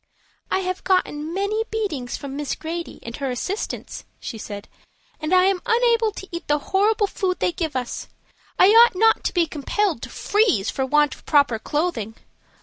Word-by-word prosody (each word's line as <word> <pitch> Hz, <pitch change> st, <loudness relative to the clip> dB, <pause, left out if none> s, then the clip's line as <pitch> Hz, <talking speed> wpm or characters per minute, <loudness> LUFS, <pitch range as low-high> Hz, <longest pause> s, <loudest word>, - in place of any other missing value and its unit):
"I 380 Hz, -, +1 dB
have 370 Hz, 0 st, -3 dB
gotten 320 Hz, -5 st, 0 dB
many 400 Hz, +4 st, 0 dB
beatings 350 Hz, -, -3 dB
from 275 Hz, -1 st, -7 dB
Miss 290 Hz, -1 st, -2 dB
Grady 335 Hz, +1 st, -6 dB
and 230 Hz, 0 st, -6 dB
her 275 Hz, -2 st, -2 dB
assistants," 370 Hz, -, -4 dB, 0.2 s
she 225 Hz, -, -6 dB
said, 205 Hz, -1 st, -7 dB, 0.5 s
"and 310 Hz, +1 st, -3 dB
I 365 Hz, 0 st, +6 dB
am 380 Hz, -1 st, +2 dB
unable 465 Hz, -1 st, +3 dB
to 385 Hz, -, -8 dB
eat 340 Hz, 0 st, -6 dB
the 295 Hz, -, +3 dB
horrible 410 Hz, +7 st, +2 dB
food 380 Hz, -2 st, -2 dB
they -, -, +1 dB
give 325 Hz, -4 st, -3 dB
us. 250 Hz, -2 st, -3 dB, 0.5 s
I 370 Hz, -, +7 dB
ought 460 Hz, 0 st, +7 dB
not 445 Hz, +4 st, +4 dB
to -, -, +1 dB
be 345 Hz, -1 st, +4 dB
compelled 315 Hz, -, -1 dB
to -, -, -6 dB
freeze 410 Hz, -, +1 dB
for 265 Hz, -1 st, -2 dB
want 295 Hz, +1 st, +3 dB
of -, -, -16 dB
proper 280 Hz, -7 st, +3 dB
clothing. 250 Hz, -, -2 dB
345 Hz, 180 wpm, -23 LUFS, 285-400 Hz, 0.5 s, I